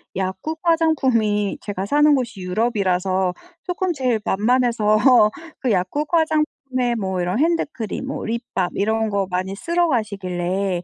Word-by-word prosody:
약국 190 - -3
화장품이 260 - +2
제가 195 -2 -4
사는 295 +5 +4
곳이 235 -7 -3
유럽이라서 185 -2 0 0.3
쪼끔 365 0 -1
제일 250 -5 0
만만해서 225 0 +3 0.3
그 255 -4 0
약국 210 +11 0
화장품에 300 -6 0
뭐 190 -2 -2
이런 180 +7 -1
핸드크림 300 -8 -1
뭐 275 - -4
립밤 225 -6 -2
이런 220 +2 0
거 200 -2 -1
많이 185 +2 -2
쓸어 340 - 0
가시길래 190 -5 -1
220 Hz, 295 characters per minute, -21 LUFS, 190-275 Hz, 0.3 s, 사는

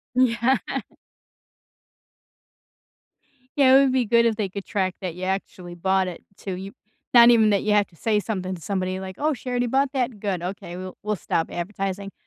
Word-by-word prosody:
Yeah. 255 +1 +3 3.0
Yeah, 265 -2 +6
it - - +8
would 265 -2 +2
be 260 -1 +3
good 235 +1 +4
if 230 -1 +2
they 210 -3 -2
could 200 +1 -7
track 185 -2 -1
that 180 -3 -4
ya 185 +1 -4
actually 185 -2 -4
bought 190 +2 +1
it 175 - -9 0.2
too, 190 -2 -5
you 190 +2 -7 0.4
not 235 -1 +9
even 220 -3 +5
that 200 - +1
you 215 - +1
have 205 -1 +3
to 170 - -24
say 210 +4 +1
something 190 -3 -3
to 170 - -12
somebody 185 0 -2
like, 190 0 -7
"Oh, 305 +1 +1
she 255 -1 -7
already 245 0 0
bought 270 +3 +1
that, 250 -5 -1
good, 195 -4 -2
okay, 180 -1 -6
we'll 185 0 -8
we'll 210 0 -1
stop 165 -3 -1
advertising," 195 +2 -4
200 Hz, 190 wpm, -24 LUFS, 185-235 Hz, 3.0 s, not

